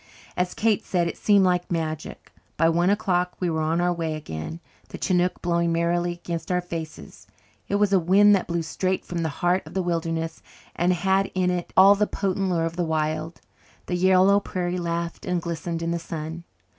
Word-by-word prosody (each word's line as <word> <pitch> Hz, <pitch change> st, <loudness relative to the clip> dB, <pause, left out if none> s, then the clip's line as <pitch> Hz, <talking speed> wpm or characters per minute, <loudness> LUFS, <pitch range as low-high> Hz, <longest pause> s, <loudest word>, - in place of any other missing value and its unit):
As 180 Hz, 0 st, -1 dB
Kate 220 Hz, -2 st, +1 dB
said, 175 Hz, -2 st, 0 dB
it -, -, -4 dB
seemed 200 Hz, -2 st, +4 dB
like 180 Hz, -1 st, 0 dB
magic. 160 Hz, -2 st, -4 dB, 0.3 s
By 165 Hz, +1 st, +4 dB
one 170 Hz, +2 st, +2 dB
o'clock 185 Hz, -4 st, +1 dB
we 180 Hz, -2 st, 0 dB
were 160 Hz, 0 st, -1 dB
on 160 Hz, +2 st, 0 dB
our 175 Hz, 0 st, +2 dB
way 165 Hz, -2 st, -3 dB
again, 150 Hz, -, -6 dB, 0.3 s
the -, -, -7 dB
chinook 180 Hz, -1 st, 0 dB
blowing 170 Hz, -1 st, +1 dB
merrily 175 Hz, +1 st, 0 dB
against 170 Hz, -1 st, -5 dB
our 180 Hz, -, +2 dB
faces. 160 Hz, -, -8 dB, 0.4 s
It 200 Hz, -, -1 dB
was 205 Hz, 0 st, +2 dB
a 190 Hz, -, +6 dB
wind 200 Hz, +4 st, +5 dB
that 190 Hz, -, -2 dB
blew 170 Hz, -1 st, -1 dB
straight 185 Hz, +3 st, -2 dB
from 175 Hz, -, -4 dB
the 160 Hz, -, -1 dB
heart 175 Hz, +5 st, +1 dB
of -, -, -12 dB
the 190 Hz, -, 0 dB
wilderness 165 Hz, -1 st, -2 dB, 0.3 s
and 175 Hz, +2 st, +2 dB
had 190 Hz, +2 st, +1 dB
in 180 Hz, -1 st, +2 dB
it 175 Hz, -1 st, -3 dB
all 195 Hz, +2 st, +9 dB
the 205 Hz, +1 st, +1 dB
potent 195 Hz, -1 st, -1 dB
lure 165 Hz, -2 st, +1 dB
of 165 Hz, +1 st, -4 dB
the 175 Hz, -, +1 dB
wild. 155 Hz, 0 st, -2 dB, 0.4 s
The 180 Hz, -, -2 dB
yellow 190 Hz, +2 st, +5 dB
prairie 180 Hz, -2 st, -3 dB
laughed 170 Hz, 0 st, -3 dB
and 180 Hz, -1 st, +1 dB
glistened 170 Hz, 0 st, -4 dB
in 165 Hz, -, -1 dB
the 170 Hz, -, -1 dB
sun. 165 Hz, +1 st, -6 dB
175 Hz, 200 wpm, -24 LUFS, 165-185 Hz, 0.4 s, all